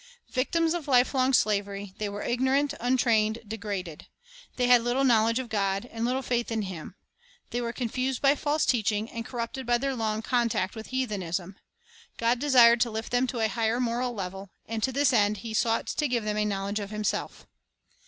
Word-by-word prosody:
Victims 325 +5 +1
of 340 -4 -4
lifelong 260 0 +3
slavery, 200 -4 0
they 210 -1 -2
were 205 +1 -5
ignorant, 265 +4 +1
untrained, 230 -3 +2
degraded. 200 -6 -5 0.5
They 250 - +1
had 245 -1 +6
little 245 +3 +1
knowl 225 -4 +4
edge 230 +1 +1
of 260 -1 -3
God, 200 -1 -1
and 225 0 -4
little 255 +3 0
faith 240 -1 -1
in 220 -1 -1
Him. 185 -1 -7 0.6
They 245 - -1
were 235 -1 -2
con 245 0 -3
fused 255 +2 -2
by 275 0 +4
false 295 +1 0
teaching, 220 -2 0
and 230 - -5
corrupted 245 +1 -5
by 240 0 +3
their 270 +2 -2
long 220 -2 -2
contact 235 -6 0
with 220 0 -8
heathenism. 195 -8 -3 0.6
God 235 +1 +1
desired 240 -4 +6
to 240 - +3
lift 220 0 -5
them 245 +1 +2
to 240 -2 -3
a 220 - +3
higher 225 +3 0
moral 245 0 -1
level; 195 0 -6 0.2
and 225 0 -4
to 260 - +1
this 280 0 +2
end 210 -2 +3
He 225 - -4
sought 225 +1 +1
to 300 - -1
give 240 -3 -1
them 210 0 -2
a 210 - +1
knowledge 200 0 -2
of 200 -1 -5
Himself. 210 0 -3
230 Hz, 195 wpm, -27 LUFS, 210-255 Hz, 0.6 s, had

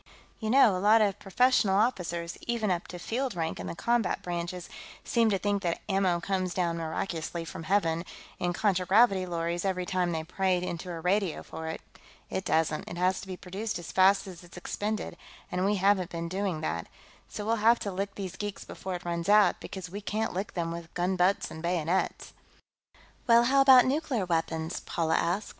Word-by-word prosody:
"You 220 - -3
know, 235 -5 +6
a - - -1
lot 215 +3 +6
of 205 -1 0
professional 210 -1 +3
officers, 175 -7 0
even 230 -4 0
up 175 -1 -2
to 180 - -8
field 240 +5 -2
rank 165 -1 -2
in - - -5
the - - -5
combat 235 +1 0
branches, 175 0 -4 0.4
seem 230 -2 +2
to 200 - +2
think 200 +1 0
that 170 -3 -1
ammo 190 -3 +2
comes 185 0 -2
down 170 -2 0
miraculously 165 0 -3
from 165 - -7
Heaven, 165 -3 +1 0.4
in 175 - 0
contragravity 190 +1 +3
lorries, 170 0 -2
every 185 -2 -1
time 180 -1 0
they 160 -1 -2
pray 185 +2 0
into 180 0 -5
a 170 -2 -5
radio 185 0 0
for 160 0 -7
it. 160 - -5 0.5
It 190 - -2
doesn't; 160 -2 0
it 175 - -6
has 185 +1 +1
to - - -10
be 185 -1 -6
produced 200 +5 -4
as 175 -2 -8
fast 195 +1 +4
as 180 -3 -10
it's 175 0 -14
expended, 210 +4 -3 0.3
and 180 0 -1
we 205 +1 +2
haven't 195 -2 +2
been 170 0 -4
doing 185 -2 -2
that. 85 - -3 0.4
So 205 - -6
we'll 225 +1 +1
have 230 +2 +5
to 200 - -3
lick 195 +2 -4
these 190 -2 -5
geeks 205 0 -5
before 190 -1 -6
it 175 - -8
runs 170 +1 -2
out, 210 0 +5
because 185 -3 -7
we 205 +2 -5
can't 215 +2 -2
lick 195 +3 -4
them 165 -2 -1
with 170 0 -7
gunbutts 180 +2 +1
and 160 - -8
bayonets." 175 +1 -1 0.9
"Well, 235 0 +7
how 275 +3 +4
about 260 -2 +8
nuclear 265 -6 0
weapons?" 165 -1 -1
Paula 160 -1 -1
asked. 190 +5 -1
185 Hz, 195 wpm, -29 LUFS, 170-205 Hz, 0.9 s, about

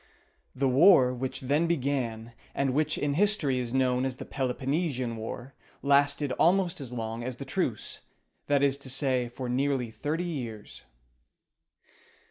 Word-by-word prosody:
The 135 +1 +1
war 135 -1 +6
which 130 +2 -4
then 145 +6 +1
began, 125 -7 -2 0.2
and 135 -2 +1
which 155 +2 +1
in 145 -1 0
history 170 -7 +2
is 120 -2 -3
known 130 -1 +2
as 130 -1 -2
the - - -7
Peloponnesian 130 -1 -2
War, 120 +4 -7 0.3
lasted 140 0 +3
almost 175 -2 +3
as 130 -3 -6
long 115 -1 -4
as 125 0 -4
the - - -8
truce; - - -2 0.5
that 145 -1 +3
is 140 0 +2
to 140 - -8
say, 130 -2 0
for 125 +1 -6
nearly 130 -1 0
thirty 155 +8 -2
years. 120 -11 -6
135 Hz, 145 wpm, -28 LUFS, 125-145 Hz, 0.5 s, war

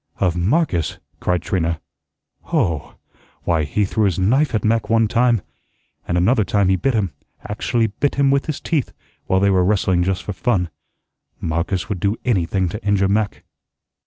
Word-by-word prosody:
"Of 90 -3 +1
Marcus!" 90 - +1 0.2
cried 90 -1 0
Trina. 85 -3 -1 0.7
"Hoh! 80 -5 -1 0.5
Why, 80 -3 +1
he 105 +8 0
threw 110 +2 +1
his 95 -4 +1
knife 125 +8 +2
at 110 - 0
Mac 115 +1 +1
one 115 -1 +4
time, 120 -2 +2 0.6
and 85 - 0
another 110 +6 +3
time 100 0 +1
he 95 - +4
bit 130 +7 0
him, 100 -5 0 0.4
actually 115 +2 0
bit 120 +7 -1
him 140 -1 +3
with 140 0 +1
his 155 -3 -2
teeth, 155 -7 -1 0.3
while 95 - +3
they 100 0 +3
were 95 -1 +3
wrestling 95 -2 +2
just 95 +1 -1
for 105 - -4
fun. 90 -2 0 0.7
Marcus 85 +3 -1
would 100 -3 -3
do 100 +4 +1
anything 95 -5 +1
to 105 +6 -6
injure 100 -2 +2
Mac." 105 0 0
100 Hz, 170 wpm, -20 LUFS, 90-115 Hz, 0.7 s, one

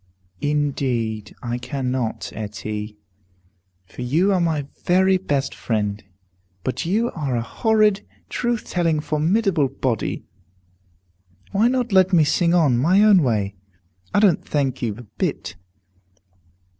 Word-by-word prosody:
"Indeed 130 -7 -1
I 120 0 -3
cannot, 125 -3 -3
Etty, 105 0 -5 0.9
for 110 - -10
you 165 +11 +2
are 185 - +2
my 160 -4 0 0.2
very 190 +1 +4
best 145 -7 -1
friend. 105 -2 -2 0.6
But 130 +5 -2
you 225 +6 +1
are 140 -6 -2
a 115 - -1
horrid, 215 - +2 0.3
truth 240 -2 -2
telling, 165 -3 0
formidable 160 +2 +1
body. 125 -4 -2 1.3
Why 210 +4 +3
not 250 -2 0
let 190 -1 +4
me 165 -3 +6
sing 170 +3 +2
on, 145 -9 +3
my 185 +10 +4
own 205 -4 +6
way? 105 -7 0 0.6
I - - +3
don't 200 -6 +3
thank 135 -3 -1
you 110 -4 -1
a 120 - -10
bit. 105 - -4
150 Hz, 125 wpm, -22 LUFS, 120-190 Hz, 1.3 s, me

